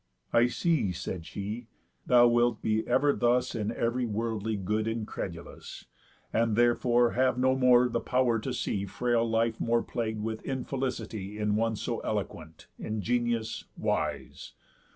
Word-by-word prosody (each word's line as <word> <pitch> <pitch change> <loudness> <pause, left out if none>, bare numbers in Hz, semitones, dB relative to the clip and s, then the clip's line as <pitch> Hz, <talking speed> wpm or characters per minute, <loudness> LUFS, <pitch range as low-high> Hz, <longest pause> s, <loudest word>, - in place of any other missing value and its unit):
"I 120 +1 +5
see," 155 - +1
said 85 -1 -5
she, 105 +4 -5 0.4
"thou 120 -1 +7
wilt 120 -1 +2
be 110 0 0
ever 145 +2 +3
thus 125 +1 +1
In 105 -3 -2
ev'ry 120 +1 -1
worldly 110 0 -2
good 105 +3 -1
incredulous, 105 -6 -6 0.5
And 115 -1 +2
therefore 120 0 +3
have 130 -1 +2
no 130 +1 +3
more 125 -1 +5
the 120 -1 -1
pow'r 125 -2 +1
to 130 +4 -4
see 100 -5 -2
Frail 120 +2 0
life 115 0 +1
more 115 0 +2
plagued 110 -2 -3
with 110 0 -3
infelicity 125 -6 -4
In 105 -1 0
one 115 +1 +1
so - - -3
eloquent, 80 0 -5
ingenious, 115 +1 -1
wise. - - -3
115 Hz, 140 wpm, -29 LUFS, 110-125 Hz, 0.5 s, thou